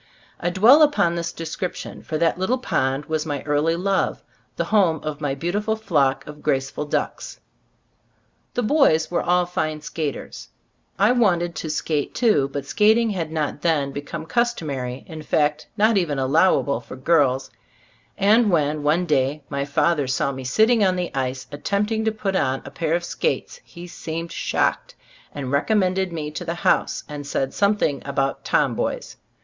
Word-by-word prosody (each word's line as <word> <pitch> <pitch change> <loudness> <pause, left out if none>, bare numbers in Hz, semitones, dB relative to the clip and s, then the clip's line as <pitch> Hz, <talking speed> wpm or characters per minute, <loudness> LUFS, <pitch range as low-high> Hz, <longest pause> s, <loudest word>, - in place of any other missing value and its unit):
I 175 - 0
dwell 220 - +6
upon 290 - +4
this 170 -1 -3
description, 175 +2 -5
for 155 - -3
that 170 +2 +1
little 225 +8 +1
pond 135 - -1
was 155 0 -1
my 145 -3 -4
early 150 +2 +1
love; 195 +2 0 0.3
the - - 0
home 175 -7 +4
of 155 -1 -5
my 140 -2 -1
beautiful 205 +8 -1
flock 145 -11 +1
of 150 0 -10
graceful 135 0 -1
ducks. - - -3 1.2
The 245 - 0
boys 215 - +3
were 175 - +1
all 180 0 +2
fine 155 -3 -2
skaters; 150 -2 -5 0.5
I 205 +5 +4
wanted 175 -8 +2
to 160 - -5
skate, 150 -1 -2
too, 210 - +3
but 140 -1 -4
skating 220 +7 +3
had 165 -5 -3
not 150 -2 -2
then 150 -5 +1
become 145 +3 -6
cus 235 +8 +1
tomary, 130 -5 -5
in 160 -2 -8
fact, 150 0 0
not 215 0 +4
even 155 -6 -1
allowable 140 -1 +2
for 120 - -10
girls; 130 -2 +2 0.7
and 215 +3 +4
when, 155 -3 +1
one 155 +5 +2
day, 145 -1 0
my 140 -1 -2
father 145 0 +1
saw 130 +2 0
me 135 -1 -7
sitting 220 - +3
on 185 -2 +3
the 180 -1 -3
ice 130 -1 -2
attempting 210 +9 -1
to 220 - +2
put 210 -3 -3
on 130 -7 0
a - - -8
pair 165 0 -1
of 175 - -2
skates, 480 - -2
he 175 -1 -11
seemed 165 -1 -6
shocked, - - -1 0.4
recommended 185 - 0
me 155 -3 -4
to 155 - -5
the 170 0 -3
house, - - +1
and 145 -2 -7
said 135 -1 -1
something 200 -9 +1
about 135 0 -2
"tom - - +2
boys." - - -3
160 Hz, 165 wpm, -22 LUFS, 145-190 Hz, 1.2 s, dwell